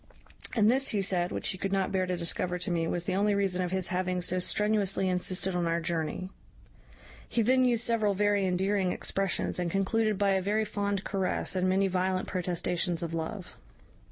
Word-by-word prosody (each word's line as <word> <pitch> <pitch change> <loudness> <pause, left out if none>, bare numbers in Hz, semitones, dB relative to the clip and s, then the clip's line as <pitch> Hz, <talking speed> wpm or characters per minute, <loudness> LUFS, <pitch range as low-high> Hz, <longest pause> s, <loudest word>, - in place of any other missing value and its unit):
And 215 -1 +5
this, 270 +2 +2
he 205 - +1
said, 180 -2 +1
which - - -1
he 185 - -2
could 195 - -2
not 195 -1 0
bear 185 -1 0
to 180 -1 -1
discover 175 +1 -1
to 180 0 -3
me, 165 -1 0
was 175 +1 -1
the 185 - -2
only 205 +2 +2
reason 190 -2 +1
of 180 - -1
his 190 0 -1
having 185 0 -1
so 180 +1 0
strenuously 200 0 +1
insisted 185 +1 0
on 175 -1 0
our 165 0 +1
journey. 170 +2 -3 1.0
He 230 - +1
then 255 +3 +4
used 240 -2 +2
several 215 -4 +2
very 205 -1 +2
endearing 190 +1 +1
expressions, 195 -1 -1
and 175 -1 -1
concluded 210 +3 +1
by 200 0 +2
a 190 -1 +2
very 210 +3 0
fond 200 -1 -2
caress, 190 -1 -1
and 185 0 +1
many 195 +1 +2
violent 185 0 0
protestations 175 -1 -1
of 165 -1 -4
love. 165 +4 -5
190 Hz, 195 wpm, -29 LUFS, 180-205 Hz, 1.0 s, And